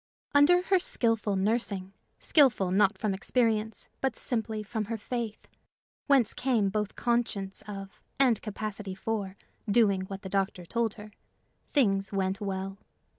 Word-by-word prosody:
Under 330 +5 +6
her 380 0 +3
skillful 225 - +1
nursing 195 -2 -1 0.2
skillful, 240 - +3
not 195 +1 +3
from 210 0 -1
experience, 220 +1 0
but 265 -3 0
simply 220 -3 -2
from 215 +1 -3
her 225 +2 -3
faith, 230 0 -5 0.6
whence 270 -6 +4
came 240 -6 +1
both 210 0 -2
conscience 230 -5 -1
of 195 -1 -8 0.2
and 250 -5 +4
capacity 210 -2 -5
for 200 -1 -3 0.3
doing 200 -3 +4
what 195 +1 -8
the - - -5
doctor 190 -2 -1
told 230 +3 -1
her 210 0 -11 0.6
things 195 -8 +2
went 195 +1 -1
well. 195 -1 -4
210 Hz, 135 wpm, -29 LUFS, 195-235 Hz, 0.6 s, Under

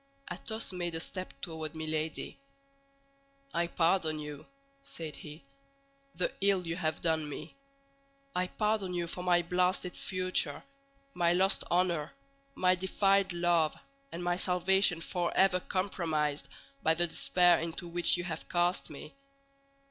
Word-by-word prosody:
Athos 220 +3 -2
made 175 -2 -2
a - - 0
step 185 +2 -4
toward 160 -1 -5
Milady. 155 0 -3 1.1
"I 170 0 +1
pardon 165 -2 +2
you," 150 -1 -7 0.4
said 160 - -7
he, 150 +2 -10 0.7
"the - - 0
ill 195 -2 +3
you 165 0 -2
have 160 -3 -2
done 160 -2 +1
me. - - -8 0.8
I 180 0 +1
pardon 210 -3 0
you 175 -1 0
for 180 +1 -5
my 175 -1 +3
blasted 180 +1 0
future, 185 -5 0 0.5
my 170 -1 +3
lost 190 +2 +3
honor, 175 -4 +1 0.4
my 185 0 +4
defiled 195 +1 +2
love, 170 -2 +2 0.4
and 175 - -5
my 175 0 +1
salvation 180 -1 +3
forever 180 +2 +2
compromised 160 -7 -1 0.3
by 160 0 +3
the 175 +1 +2
despair 175 +1 +4
into 165 +2 -4
which 175 +1 +2
you 175 - -3
have 165 -3 -5
cast 175 +1 +1
me. 150 - -9
175 Hz, 135 wpm, -31 LUFS, 160-185 Hz, 1.1 s, my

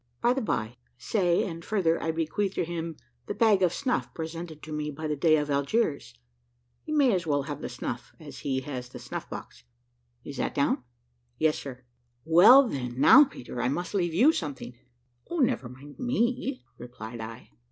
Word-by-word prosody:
By 240 - +3
the 265 - -2
bye, 120 - -2 0.2
say, 175 - +1
and 165 -6 -6
further, 170 -6 +1
I 160 - -2
bequeath 165 +5 -1
to - - 0
him 165 -1 -5 0.3
the - - -3
bag 215 -4 +4
of 180 -2 +4
snuff 260 +3 -1
presented 165 -1 -6
to 155 - -9
me 150 0 -2
by 155 +2 -6
the 150 -1 -1
Dey 155 +2 +4
of 150 -1 -2
Algiers; 140 - 0 0.7
he 310 - -8
may 285 -6 +4
as 180 -3 -1
well 145 -2 +1
have 145 +1 -6
the - - -4
snuff 125 0 -5
as 145 -4 -10
he 130 -2 -1
has 125 -2 -6
the 125 - -9
snuff 125 0 -7
box. - - -9 0.6
Is 140 - -8
that - - -2
down?" 140 -3 +1 0.5
"Yes, 155 -1 +2
sir." 130 -2 -9 0.4
"Well 205 +12 +8
then, 125 - -4
now, 285 - +9
Peter, 125 - -7
I 125 - +1
must 175 +8 -3
leave 175 -5 0
you 270 - +6
something." 145 - -5 0.6
"O, 345 - -3
never 235 - +1
mind 140 +3 -13
me," 255 +1 -1
replied 120 -1 -8
I. 110 - -9
160 Hz, 185 wpm, -27 LUFS, 135-200 Hz, 0.7 s, now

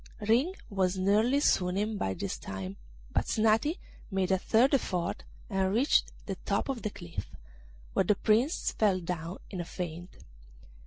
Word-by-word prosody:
Ring 245 - +2
was 190 -2 0
nearly 215 +8 +3
swooning 200 -4 +2
by 95 - -1
this 100 - -4
time, 95 0 -6 0.3
but - - +1
Snati 225 - +2 0.3
made 190 -2 0
a 190 - +3
third 240 +8 +3
effort 180 -10 0 0.2
and 190 -1 +1
reached 245 +8 +3
the - - -4
top - - -1
of 260 -4 -2
the 215 - -2
cliff, 175 -4 -7 0.6
where - - +2
the 210 - +4
Prince 230 - +2
fell 200 -4 +2
down 170 0 -4
in 185 - -3
a - - -3
faint. 175 0 -6
195 Hz, 155 wpm, -30 LUFS, 180-225 Hz, 0.6 s, the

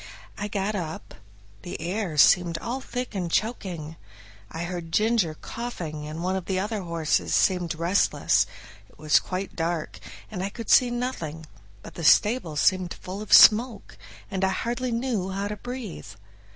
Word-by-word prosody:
I 205 - -4
got 205 0 -2
up; 165 -6 -5 0.5
the 175 - -7
air 175 0 -3
seemed 170 +3 +5
all 245 +8 -4
thick 250 -1 -5
and 180 -4 -3
choking. 175 -8 -2 0.5
I 165 - -5
heard 175 -2 -5
Ginger 215 -6 +2
coughing 160 -10 -6
and 155 +2 -6
one 185 +1 0
of 190 -2 -4
the 190 -1 -1
other 210 +1 -2
horses 170 -3 0
seemed 180 -3 +2
very 160 - -10
restless; 185 +4 +2 0.4
it - - -23
was 155 -1 +4
quite 185 +1 -5
dark, 165 -1 -3 0.3
and 185 -4 -4
I 195 - -2
could 230 +1 -5
see 250 - +6
nothing, 240 - -4 0.4
but - - -10
the 170 - -7
stable 205 0 +4
seemed 185 +3 +2
full 190 +3 -7
of 215 - -9
smoke, 220 -1 +6 0.4
and 190 0 -2
I 190 - +3
hardly 240 +6 -2
knew 230 -5 -1
how 195 +1 -3
to 210 - -3
breathe. 245 -4 -7
190 Hz, 165 wpm, -25 LUFS, 170-220 Hz, 0.5 s, see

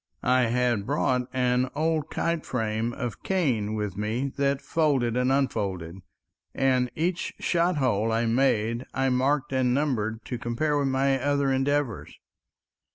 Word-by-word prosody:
I 125 -1 +3
had 120 -3 0
brought 125 -3 +1
an 125 0 +1
old 155 0 0
kite 170 -1 -1
frame 115 -1 -2
of 120 -4 -5
cane 125 - 0
with 105 -3 -3
me, 115 +7 -2
that 140 0 +1
folded 140 -9 +1
and 125 +1 +2
unfolded, 95 -10 -1 0.6
and 130 -2 +2
each 170 +3 -2
shot 175 -1 +1
hole 115 -5 +1
I 115 +1 +1
made 115 -1 +1
I 135 0 +1
marked 135 +2 +1
and 125 -1 +2
numbered 115 -6 -1
to 125 - -4
compare 135 +7 -1
with 140 - +1
my 135 0 +1
other 140 0 +1
endeavors. 135 -2 -1
130 Hz, 145 wpm, -26 LUFS, 115-140 Hz, 0.6 s, I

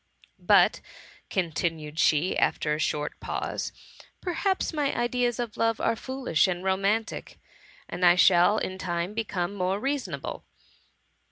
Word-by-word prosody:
But," - - +4 0.5
continued 165 -3 -2
she, 160 +3 +3
after 150 - +1
a 150 - -2
short 150 -1 -2
pause, - - -3 0.3
'^ - - -15 0.2
perhaps 375 +1 -1
my 290 -3 0
ideas 240 0 0
of 235 -3 -4
love 225 0 +1
are - - +1
foolish 260 -10 0
and 180 -1 -3
romantic, 195 +4 -1 0.5
and 180 - -5
I 175 0 +7
shall 180 +3 +5
in 185 0 -3
time 175 +1 -2
become 200 -4 -2
more 190 0 -1
reasonable. 275 +3 -3
190 Hz, 135 wpm, -27 LUFS, 175-240 Hz, 0.5 s, I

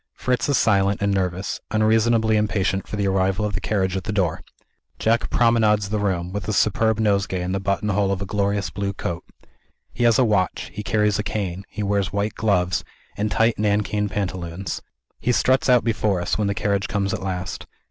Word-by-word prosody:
Fritz 125 +2 -1
is 140 - +3
silent 100 -2 +2
and 100 -1 +1
nervous; 95 0 -2
unreasonably 110 +1 +3
impatient 100 -2 0
for - - -5
the 100 -1 0
arrival 95 +1 +1
of 105 - -2
the 95 - -2
carriage 95 -3 0
at 95 - -2
the 105 - -2
door. 90 -6 0 0.6
Jack 115 +1 +1
promenades 110 -4 +3
the 105 - 0
room, 90 -3 -1
with 100 -2 -4
a 110 - 0
superb 110 +2 +2
nosegay 100 -3 +1
in 90 - -3
the 95 - -1
button 100 +2 -1
hole 100 -1 +1
of 100 - -1
a 100 - -4
glorious 100 -2 -1
blue 100 +2 -3
coat. 85 -2 -4 0.7
He - - -2
has 115 0 +5
a 130 - +4
watch; 100 -4 0
he 105 - -5
carries 105 -1 +1
a - - 0
cane; 95 -3 -3
he 105 - -4
wears 100 -2 0
white 100 +2 -1
gloves, 90 -5 +1 0.3
and 105 +1 -1
tight 115 +1 +2
nankeen 105 0 0
pantaloons. 90 -2 -4 0.4
He 125 - +1
struts 130 +2 +2
out 125 -1 +5
before 110 -4 0
us, 85 - -1
when 105 -2 0
the 100 - -1
carriage 100 -1 0
comes 100 -1 -1
at - - -3
last. 95 -1 -4
100 Hz, 200 wpm, -22 LUFS, 95-110 Hz, 0.7 s, has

